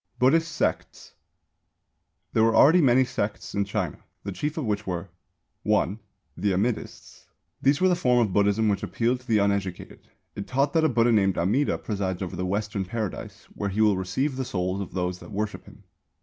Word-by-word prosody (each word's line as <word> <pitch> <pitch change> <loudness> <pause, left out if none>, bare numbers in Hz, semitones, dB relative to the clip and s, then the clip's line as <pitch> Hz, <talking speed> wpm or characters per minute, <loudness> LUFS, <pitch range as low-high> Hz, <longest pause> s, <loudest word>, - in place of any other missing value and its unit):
BUDDHIST 160 +6 +3
SECTS. - - -3 1.2
There 110 - +3
were 115 0 +3
already 165 +5 +7
many 130 -2 +4
sects 125 -5 -4
in 100 0 0
China, 100 -6 -3 0.2
the 100 - -4
chief 150 - -3
of 155 - -2
which 105 -1 -2
were: 90 +1 -4 0.5
(1) 100 +5 +1 0.4
The 100 -2 0
Amidists. 105 +5 -3 0.4
This 140 +1 +3
was 185 0 +4
the - - +3
form 125 -8 +2
of 110 -6 +2
Buddhism 105 +2 +2
which 100 -2 +1
appealed 120 +2 0
to 125 - -22
the 110 -3 +3
uneducated. 100 -3 -2 0.3
It 100 - -6
taught 140 +2 +1
that 160 -1 +3
a 160 - +4
Buddha 120 -1 +3
named 95 -4 +2
Amida 105 +12 +1
presides 95 -3 -3
over 95 0 -5
the 90 +1 -2
Western 105 +1 -2
Paradise, 105 +1 -5
where 100 - -3
he 100 +3 -1
will 105 -2 +4
receive 130 +10 -2
the 130 - -1
souls 95 -4 -2
of 95 - -7
those 90 0 -2
that - - -12
worship 105 0 -4
him. - - -16
105 Hz, 190 wpm, -26 LUFS, 95-125 Hz, 1.2 s, already